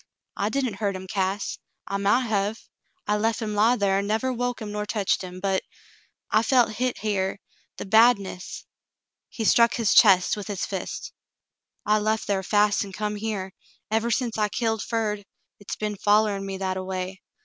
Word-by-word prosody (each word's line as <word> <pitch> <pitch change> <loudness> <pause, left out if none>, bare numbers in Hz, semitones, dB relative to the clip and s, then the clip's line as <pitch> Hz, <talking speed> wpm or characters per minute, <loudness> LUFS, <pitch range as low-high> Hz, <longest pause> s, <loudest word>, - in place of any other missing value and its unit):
"L 200 - 0
didn't 255 -5 -1
hurt 200 -1 -1
him, 185 0 -7
Cass. 195 +1 -2 0.3
I - - -4
mount 205 +6 +2
hev. 210 0 -1 0.4
I 210 0 +1
lef 225 +2 0
him 215 -2 -3
lie 220 +4 +4
thar 195 -2 +2
an' 200 - -3
never 225 +5 0
woke 245 0 -2
him 215 -2 -6
nor 210 0 -3
teched 205 -3 0
him, 185 -1 -7
but 190 0 0 0.4
— - - -32 0.3
I 215 - +4
felt 240 -1 +3
hit 250 0 0
here 200 -3 -1 0.2
— - - -39
the - - -5
badness." 200 -3 +2 0.6
He 225 - -4
struck 235 +2 +5
his 230 -4 +2
chest 190 -5 +6
with 205 -2 -7
his 200 -3 -2
fist. 190 -2 -5 0.7
"I 215 0 +3
lef 215 +1 0
thar 195 -1 0
fast 205 +1 +2
an' 195 -1 -9
come 210 +1 -2
here. 205 -3 -4 0.4
Ever 225 +2 +1
sence 235 -2 -1
I 210 -1 +2
killed 225 -1 -1
Ferd, 215 -3 -2 0.4
hit's 205 - -6
be'n 210 -1 -3
follerin' 205 -1 +2
me 195 -1 -4
that 190 -1 -2
a 185 - -3
way. 185 0 -5
210 Hz, 190 wpm, -25 LUFS, 195-225 Hz, 0.7 s, chest